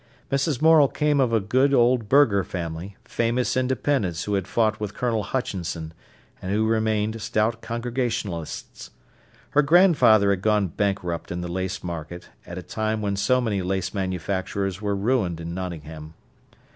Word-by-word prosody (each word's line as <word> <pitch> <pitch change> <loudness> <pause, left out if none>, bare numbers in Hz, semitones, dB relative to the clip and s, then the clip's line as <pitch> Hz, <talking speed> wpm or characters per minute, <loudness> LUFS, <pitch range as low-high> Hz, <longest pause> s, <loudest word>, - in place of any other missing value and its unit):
Mrs. 140 0 0
Morel 160 -3 +7
came 150 +1 +1
of 130 -3 +2
a 115 - +3
good 130 +7 +2
old 120 -3 +3
burgher 120 -8 +4
family, 85 +2 -6
famous 120 +2 0
independents 130 - 0
who 105 - -3
had 95 -2 -1
fought 110 -2 +1
with 105 -1 -5
Colonel 115 -3 0
Hutchinson, 85 -9 -4 0.5
and 95 - -4
who 110 +2 +1
remained 110 0 0
stout 110 +2 0
Congregationalists. 115 - -4 0.6
Her 150 - +4
grandfather 140 - +5
had 95 -2 -1
gone 105 -2 +2
bankrupt 90 -2 -2
in 90 0 -3
the 90 - -4
lace 95 +1 -3
market 85 0 -7 0.2
at 85 - -7
a 90 - -6
time 110 +1 -2
when 100 -1 -1
so 125 +6 +2
many 110 -6 -1
lace 95 0 -2
manufacturers 95 0 -2
were 100 -1 -1
ruined 100 -5 0
in 85 0 -6
Nottingham. 80 -4 -7
105 Hz, 155 wpm, -24 LUFS, 90-120 Hz, 0.6 s, Morel